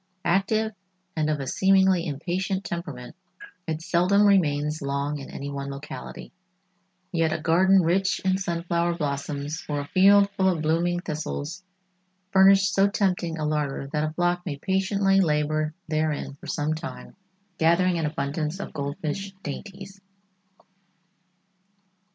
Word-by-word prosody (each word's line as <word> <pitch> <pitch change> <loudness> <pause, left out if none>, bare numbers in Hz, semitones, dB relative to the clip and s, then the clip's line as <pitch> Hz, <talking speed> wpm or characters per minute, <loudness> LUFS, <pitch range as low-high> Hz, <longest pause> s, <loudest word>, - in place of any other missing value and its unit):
Active 215 +4 +1 0.4
and 155 -1 0
of 150 -1 0
a 135 - -3
seemingly 190 +1 +3
impatient 185 +6 -2
temperament, 155 -8 -6 0.5
it 160 0 -3
seldom 185 +3 +3
remains 150 -6 +2
long 140 +1 -2
in 135 - -9
any 140 +1 -6
one 140 0 -5
locality, 140 +2 -8 0.8
yet 165 -2 +1
a 160 - -1
garden 185 +4 +4
rich 190 +4 +1
in 190 0 +1
sunflower 170 -1 -1
blossoms 145 0 -3
or 145 -1 -1
a - - -6
field 200 +3 +6
full 190 -2 +2
of 165 -4 -1
blooming 170 +3 +1
thistles 155 +1 -5 0.7
furnished 195 0 +5
so 195 +1 +4
tempting 180 -5 0
a 155 - -2
larder 150 -2 -1
that 150 0 +1
a 155 - -1
flock 175 +1 0
may 155 -6 -4
patiently 195 +3 +1
labor 155 -1 +1 0.2
therein 155 -2 -1
for 140 - -13
some 150 +1 -1
time, 160 +1 -8 0.4
gathering 170 +2 +3
an 160 - 0
abundance 150 +3 -3
of - - -6
goldfinch 155 +6 -4
dainties. 195 +5 -8
170 Hz, 135 wpm, -25 LUFS, 150-190 Hz, 0.8 s, field